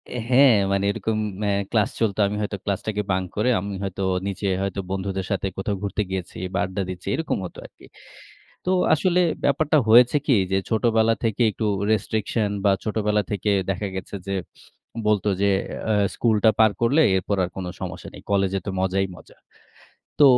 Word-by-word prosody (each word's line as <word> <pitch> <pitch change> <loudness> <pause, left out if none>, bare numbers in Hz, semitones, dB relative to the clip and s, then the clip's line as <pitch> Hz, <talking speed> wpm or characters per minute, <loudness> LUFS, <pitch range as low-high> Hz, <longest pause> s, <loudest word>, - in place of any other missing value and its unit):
এ - - -2
হ্যাঁ, 130 -2 +6 0.2
মানে 100 0 +1
এরকম 110 +1 -2 0.3
অ্যা 100 - +1 0.2
ক্লাস 105 -3 +2
চলত। 110 -3 0
আমি 105 - -3
হয়তো 105 -1 -3
ক্লাসটাকে 105 +1 -2
বাঙ্ক 95 0 0
করে, 105 +4 +1
আমি 100 +2 -5
হয়তো 95 0 -4 0.3
নিচে 100 +1 -3
হয়তো 100 0 -2
বন্ধুদের 95 0 -3
সাথে 100 0 0
কোথাও 100 +1 -2
ঘুরতে 100 +1 -1
গিয়েছি 95 -2 -5 0.2
বা 100 - 0
আড্ডা 95 +1 -4
দিচ্ছি 90 -1 -7
এরকম 160 - -2
হতো 90 - -9
আরকি। - - -15 0.8
তো 180 - -1 0.2
আসলে 180 +3 +2 0.2
ব্যাপারটা 150 +2 +2
হয়েছে 120 +4 +7
কি 140 - +3 0.2
যে, 95 - +3
ছোটবেলা 115 0 +3
থেকে 115 +1 0
একটু 110 - -4 0.3
রেস্ট্রিকশন 110 0 0 0.2
বা - - +6
ছোটবেলা 105 -1 0
থেকে 105 0 -1 0.2
দেখা 100 +2 -1
গেছে 95 +2 -6
যে - - -3 0.8
বলত 105 -1 +2 0.2
যে, - - +3 0.4
অ্যা 110 - +1 0.2
"স্কুলটা 110 -2 +3
পার 110 -1 +6
করলে 135 +7 +4
এরপর 95 +2 -1
আর 90 - -2
কোনো 90 -2 -4
সমস্যা - - -6
নেই। - - -11
কলেজে 95 -1 +1
তো - - -3
মজাই 95 +1 +1
মজা।" 80 - -16 0.8
তো 145 - +7
105 Hz, 175 wpm, -23 LUFS, 95-110 Hz, 0.8 s, হয়েছে